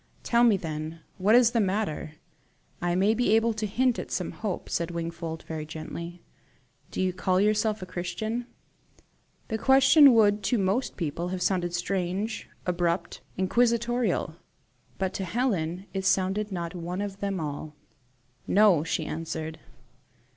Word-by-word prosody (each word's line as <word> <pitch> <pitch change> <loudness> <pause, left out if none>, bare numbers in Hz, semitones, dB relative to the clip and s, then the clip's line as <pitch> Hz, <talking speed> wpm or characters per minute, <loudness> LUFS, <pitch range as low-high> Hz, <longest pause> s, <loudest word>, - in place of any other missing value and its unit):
"Tell 235 0 +3
me, 225 -4 +5
then, 160 -1 -5 0.2
what 205 +5 +4
is 245 -1 +6
the 235 - +1
matter; 195 -6 -1 0.7
I 175 0 0
MAY 195 +4 +3
be 230 -2 +3
able 225 +1 +3
to 215 0 -2
hint 245 +4 +1
at - - -6
some 180 - -2
hope," 205 -5 -4
said 170 0 -1
Wingfold, 165 -1 -5
very 160 -1 -5
gently. 170 +2 -7 0.7
"Do - - -6
you 185 -1 +1
call 185 0 +1
yourself 215 0 +1
a - - -5
Christian?" 215 +7 -4 1.0
The 220 - -2
question 270 +2 +7
would 210 -2 +4
to 245 - +2
most 200 +6 0
people 170 0 -2
have 180 0 -3
sounded 175 -2 0
strange, 190 +4 -2 0.2
abrupt, 175 -1 -1 0.2
inquisitorial; 235 +4 +1 0.6
but 190 -1 -1
to 195 - -3
Helen 185 -4 -1
it 190 -1 -3
sounded 195 +2 +1
not 170 -2 -4
one 180 +2 -4
of 200 -1 -5
them 200 -2 -2
all. 150 0 -5 0.7
"No," 200 -6 +5
she 165 -1 -2
answered. 160 0 -5
190 Hz, 145 wpm, -27 LUFS, 170-220 Hz, 1.0 s, question